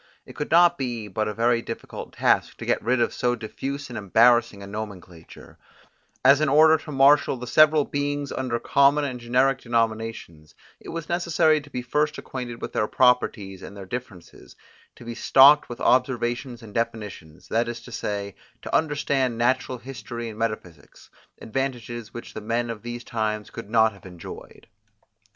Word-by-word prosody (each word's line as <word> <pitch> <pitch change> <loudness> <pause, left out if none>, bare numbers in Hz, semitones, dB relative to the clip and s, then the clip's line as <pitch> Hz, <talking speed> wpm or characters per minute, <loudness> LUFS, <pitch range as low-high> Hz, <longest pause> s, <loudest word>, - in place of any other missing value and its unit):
It - - -13
could 150 - -4
not 175 +1 +6
but 175 - -27
be 120 -6 -4
a 105 -1 -1
very 115 0 +2
difficult 115 - -8
task - - +1
to - - -7
get - - +1
rid 125 +3 +1
of 120 - +1
so 120 0 0
diffuse 135 +5 -6
and 120 - -9
embarrassing 110 0 +3
a - - -7
nomenclature; 100 -5 -9 0.7
as 140 +2 +6
in 155 - +2
order 155 +2 +6
to 155 - -9
marshal 140 0 +4
the 125 - -7
several 155 +3 +5
beings 145 0 -3
under 125 -3 -2
common 140 +3 +3
and 130 -3 -4
generic 130 +3 +1
denominations, 115 -9 -3 0.2
it - - -12
was 165 -1 -5
necessary 170 -3 +2
to 145 - -15
be 125 -3 -5
first 150 +4 0
acquainted 120 -3 -7
with - - -5
their 105 - 0
properties, 105 -7 +1
and 100 - -10
their 100 - -8
differences; 115 -4 -9 0.4
to - - -14
be 120 - -5
stocked 135 +5 +6
with 120 - -7
observations 125 -1 0
and 105 -2 -12
definitions, 105 -8 -5
that 115 +1 +1
is 120 0 -5
to 125 - -13
say, 100 -3 -4 0.3
to - - -3
understand 140 -5 0
natural 130 +2 0
history 120 -2 -7
and 110 0 -10
metaphysics, 110 -7 -6 0.3
advantages 120 -2 -4
which 120 - -9
the 110 - -6
men 115 +2 -1
of 110 -2 -8
these 120 0 -6
times 110 -2 -3
could - - -9
not 110 -1 +3
have 100 -1 -14
enjoyed. 90 -2 -11
120 Hz, 175 wpm, -24 LUFS, 110-135 Hz, 0.7 s, not